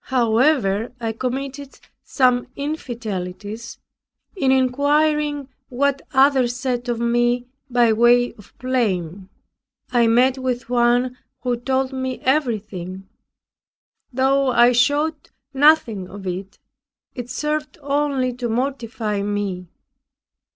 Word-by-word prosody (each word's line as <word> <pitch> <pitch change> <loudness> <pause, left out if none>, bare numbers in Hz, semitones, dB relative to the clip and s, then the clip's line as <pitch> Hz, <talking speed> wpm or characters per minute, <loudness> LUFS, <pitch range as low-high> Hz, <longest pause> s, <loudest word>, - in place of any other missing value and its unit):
However, 235 -3 +2
I 225 -1 -2
committed 270 +4 -5 0.2
some 250 -2 +2
infidelities, 225 - -5 0.6
in 275 -8 +2
inquiring 290 +2 +1 0.2
what 275 +2 0
others 265 -3 +3
said 250 -1 -3
of 235 -1 -1
me 240 +1 +1 0.2
by 240 -2 +3
way 240 +2 +4
of 210 - -17
blame. 200 -8 -2 0.6
I 240 -2 +3
met 250 +3 +3
with 250 -2 -3
one 245 +1 +2 0.2
who 250 -1 0
told 260 +2 -1
me 260 -1 -3
everything. 210 - -2 1.0
Though 270 +1 +2
I 240 0 +5
showed 290 +5 +1 0.2
nothing 265 -10 +3
of 200 0 -10
it, 190 +2 -5 0.6
it 245 -1 -7
served 300 +5 -3
only 280 -3 0
to 245 -2 -3
mortify 230 -4 -2
me. 200 -3 -3
245 Hz, 105 wpm, -21 LUFS, 225-270 Hz, 1.0 s, I